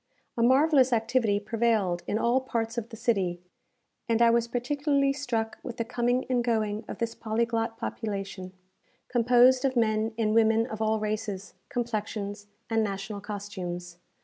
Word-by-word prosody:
A 235 - -1
marvellous 265 +2 +5
activity 225 -2 +2
prevailed 215 -5 0
in 210 - 0
all 240 +3 +2
parts 230 -3 -2
of 235 -1 -4
the 225 - -9
city; 195 -7 0 0.7
and 230 0 +2
I 235 0 +6
was 235 0 +2
particularly 275 +3 +1
struck 235 -6 -2
with 240 - -7
the 230 - -1
coming 245 +1 0
and 250 -2 +1
going 220 -2 0
of - - -6
this 230 -1 -2
polyglot 225 +1 -1
population, 195 -5 -5 0.6
composed 250 +1 +5
of 265 -1 +1
men 220 -1 +1
and 215 -2 +1
women 225 0 +4
of 220 -3 -6
all 220 0 +1
races, 210 -3 -3 0.2
complexions, 210 -4 -3 0.2
and 225 -1 +1
national 200 0 -4
costumes. 180 -4 -6
225 Hz, 150 wpm, -28 LUFS, 210-240 Hz, 0.7 s, I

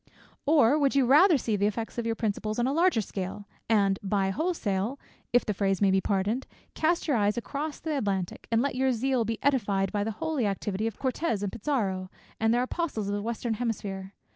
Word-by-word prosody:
Or 290 -2 +5
would 280 -1 +2
you 275 -2 +4
rather 305 +6 +6
see 225 -4 -1
the 200 0 +2
effects 225 +3 -3
of 235 - -2
your 225 - 0
principles 215 -1 -2
on 240 - +1
a 265 - +1
larger 335 -6 +3
scale, 200 +1 -5 0.2
and 200 -3 +3
by 195 -1 0
wholesale 230 - -1 0.3
(if 245 - +3
the 210 - 0
phrase 195 -1 0
may 200 -2 +4
be 190 0 +3
pardoned;) 205 +7 -1 0.3
cast 340 +2 +1
your 280 -6 +2
eyes 205 +1 +1
across 285 +5 -4
the 315 -1 -2
Atlantic, 195 -8 -2
and 230 +1 +3
let 280 - 0
your 260 +1 +2
zeal 250 0 +1
be 225 0 -2
edified 200 -8 +1
by 205 -1 0
the 220 - -2
holy 315 -8 0
activity 200 +2 -2
of 225 - -5
Cortez 260 -5 -1
and 200 - -2
Pizarro, 200 -8 -2 0.3
and 225 0 +3
their 240 +1 +3
apostles 255 - -2
of - - -1
the 205 - -1
western 230 +1 -2
hemisphere. 200 -4 -4
225 Hz, 210 wpm, -28 LUFS, 200-270 Hz, 0.3 s, rather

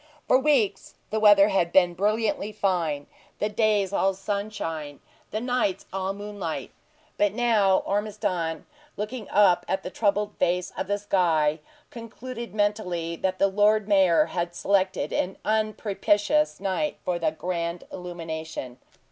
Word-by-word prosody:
For 255 - +5
weeks, 260 -9 +1 0.2
the 220 - 0
weather 205 -1 +7
had 180 -4 +1
been 175 -1 +4
brilliantly 210 +2 0
fine 175 -8 -1 0.3
the 210 - -1
days 210 -2 +1
all 195 -1 +2
sunshine, 190 -7 -4 0.3
the 215 - -3
nights 245 -5 -1
all 190 0 -1
moonlight; 200 -4 -5 0.5
but 205 -1 +3
now 215 -5 +3
Ormiston, 195 -6 -2 0.3
looking 215 +1 -5
up 195 -3 +4
at 190 0 -1
the 180 - -6
troubled 205 0 0
face 180 0 0
of - - -3
the 205 +1 0
sky, 165 -7 +1 0.3
concluded 235 +1 -8
mentally 180 -6 -1
that 185 +1 -1
the - - +4
Lord 210 +1 +3
Mayor 185 -6 +4
had 175 +1 -3
selected 190 0 0
an 185 - -1
unpropitious 215 +5 +1
night 200 +10 -1
for 175 -1 -1
the 165 -2 +2
grand 170 +1 -3
illumination. 160 -7 -6
195 Hz, 135 wpm, -26 LUFS, 175-210 Hz, 0.5 s, weather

